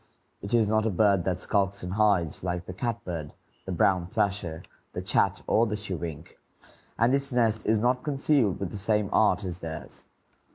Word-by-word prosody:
It 100 +4 -1
is 110 -3 +3
not 110 +1 +2
a - - +2
bird 100 -2 +3
that 90 -2 -1
skulks 100 -1 0
and 90 +1 -4
hides, 100 -8 +1
like 90 -1 -2
the 95 - -7
catbird, 90 -8 -4 0.3
the 95 - -5
brown 90 0 +2
thrasher, 90 -4 -2 0.3
the - - -3
chat, - - +1
or 115 +2 +3
the 105 - -2
chewink, 85 -6 -6 0.6
and 115 +3 +3
its 140 0 +1
nest 115 -3 +1
is 110 +1 +4
not 125 +3 +1
concealed 135 -7 +1
with 95 - -3
the 105 - -6
same 105 0 +1
art 105 -1 +3
as 90 -2 -4
theirs. 80 -2 -8
100 Hz, 180 wpm, -27 LUFS, 90-110 Hz, 0.6 s, is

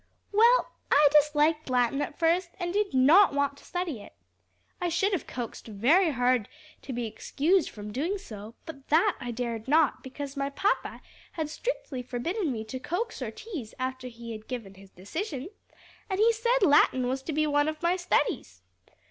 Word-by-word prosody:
"Well, 465 +4 +4 0.2
I 295 0 +6
disliked 300 +1 +3
Latin 250 +2 +2
at 290 - -4
first, 345 +2 +2
and 350 -1 -2
did 415 0 +1
not 290 +7 +6
want 285 0 +1
to - - -17
study 355 - -4
it. 85 - -14 0.7
I 350 - 0
should 385 +5 +1
have 370 - -2
coaxed 240 -2 -6
very 270 - +3
hard 250 -4 +1 0.3
to 275 - -7
be 240 -1 -2
excused 310 - 0
from 210 0 -8
doing 325 - -1
so, 220 - -10
but 275 -4 -10
that 345 +6 +3
I 245 -3 -5
dared 235 -1 -4
not, 305 +1 +3
because 275 +1 -7
my 275 0 -1
papa 390 +8 -1 0.3
had 310 -2 -3
strictly 310 - -4
forbidden 295 - -2
me 220 -3 -4
to 220 +4 -6
coax 355 - -3
or - - -2
tease 410 - -8
after 260 0 -4
he 235 -1 -9
had 215 -1 -8
given 230 -6 -6
his 195 0 -16
decision; 280 - -5 0.6
and 380 0 -1
he 435 - +5
had - - -4
said 470 +1 +1
Latin 285 -5 +4
was 260 +1 -2
to 315 - -5
be 310 +1 +1
one 290 0 +2
of 310 +1 -4
my 345 +1 +3
studies. 320 - -1
290 Hz, 185 wpm, -28 LUFS, 245-350 Hz, 0.7 s, I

